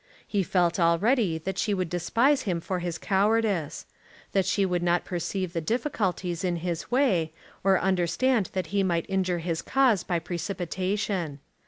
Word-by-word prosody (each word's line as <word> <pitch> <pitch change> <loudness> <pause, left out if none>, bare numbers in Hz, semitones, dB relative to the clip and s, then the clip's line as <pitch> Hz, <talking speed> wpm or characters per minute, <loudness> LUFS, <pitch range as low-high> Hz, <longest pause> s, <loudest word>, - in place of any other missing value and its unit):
He 205 - 0
felt 175 -1 +1
already 175 +3 +3
that 185 +4 -4
she 205 - +1
would 185 -2 -1
despise 230 - +2
him 185 -8 -1
for 180 +2 -3
his 175 -2 -3
cowardice, 200 -4 +1 0.5
that 195 -2 +1
she 200 - +2
would 180 -2 0
not 175 0 +1
perceive 180 0 -3
the 165 - -1
difficulties 190 - -1
in 180 -2 0
his 170 -1 -4
way, 205 - +2 0.3
or 195 -1 +4
understand 190 +5 +1
that 185 -1 -1
he 200 - +3
might 170 -3 0
injure 185 -2 0
his 165 -2 -1
cause 255 -9 +2
by 175 - 0
precipitation. 180 -1 -3
185 Hz, 160 wpm, -27 LUFS, 170-205 Hz, 0.5 s, or